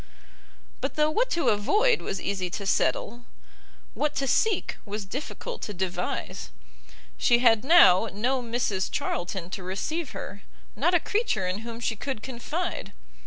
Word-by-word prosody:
But 270 Hz, +1 st, -2 dB
though 305 Hz, 0 st, +3 dB
what -, -, +1 dB
to 340 Hz, -7 st, +2 dB
avoid 425 Hz, -, +3 dB
was -, -, -3 dB
easy 190 Hz, -2 st, -2 dB
to 200 Hz, +3 st, -5 dB
settle, 235 Hz, +4 st, 0 dB, 0.7 s
what 300 Hz, -, -1 dB
to 275 Hz, -, 0 dB
seek 405 Hz, -, +1 dB
was 205 Hz, -1 st, -5 dB
difficult 300 Hz, -, -6 dB
to 210 Hz, -, -5 dB
devise. 180 Hz, -, -3 dB, 0.7 s
She 240 Hz, -, +5 dB
bad 230 Hz, -3 st, +4 dB
now 255 Hz, -, +7 dB
no 250 Hz, +6 st, 0 dB
Mrs 230 Hz, -5 st, -1 dB
Charlton 175 Hz, 0 st, -3 dB
to 195 Hz, -, -4 dB
receive 255 Hz, -, -3 dB
her, 200 Hz, -, -7 dB, 0.3 s
not 345 Hz, +5 st, +2 dB
a -, -, +5 dB
creature 410 Hz, -, 0 dB
in 185 Hz, +2 st, -2 dB
whom 230 Hz, +1 st, -7 dB
she 230 Hz, -1 st, -1 dB
could 240 Hz, 0 st, -5 dB
confide. 280 Hz, +8 st, -4 dB
235 Hz, 150 wpm, -27 LUFS, 195-305 Hz, 0.7 s, now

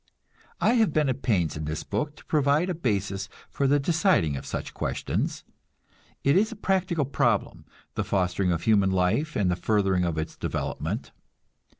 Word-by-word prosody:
I 230 Hz, -, +3 dB
have 205 Hz, -9 st, +2 dB
been 150 Hz, -3 st, +2 dB
at 130 Hz, +1 st, -2 dB
pains 90 Hz, -, +1 dB
in 75 Hz, 0 st, -4 dB
this 80 Hz, +1 st, -3 dB
book 150 Hz, 0 st, -3 dB
to -, -, -17 dB
provide 150 Hz, +4 st, +2 dB
a -, -, 0 dB
basis 100 Hz, -, -2 dB, 0.2 s
for 140 Hz, -, +1 dB
the 145 Hz, +2 st, +4 dB
deciding 165 Hz, -, +2 dB
of 65 Hz, -, -6 dB
such -, -, -4 dB
questions. -, -, -2 dB, 0.8 s
It 140 Hz, -, +4 dB
is 215 Hz, +4 st, +3 dB
a -, -, -6 dB
practical 185 Hz, -6 st, 0 dB
problem, 140 Hz, -, 0 dB, 0.3 s
the -, -, -1 dB
fostering 90 Hz, -1 st, 0 dB
of 85 Hz, -2 st, -1 dB
human 100 Hz, -3 st, +4 dB
life 95 Hz, +12 st, +1 dB
and 95 Hz, -3 st, +2 dB
the -, -, +1 dB
furthering 95 Hz, -2 st, +1 dB
of 85 Hz, -3 st, -1 dB
its 80 Hz, 0 st, -3 dB
development. -, -, -3 dB
110 Hz, 175 wpm, -26 LUFS, -, 0.8 s, the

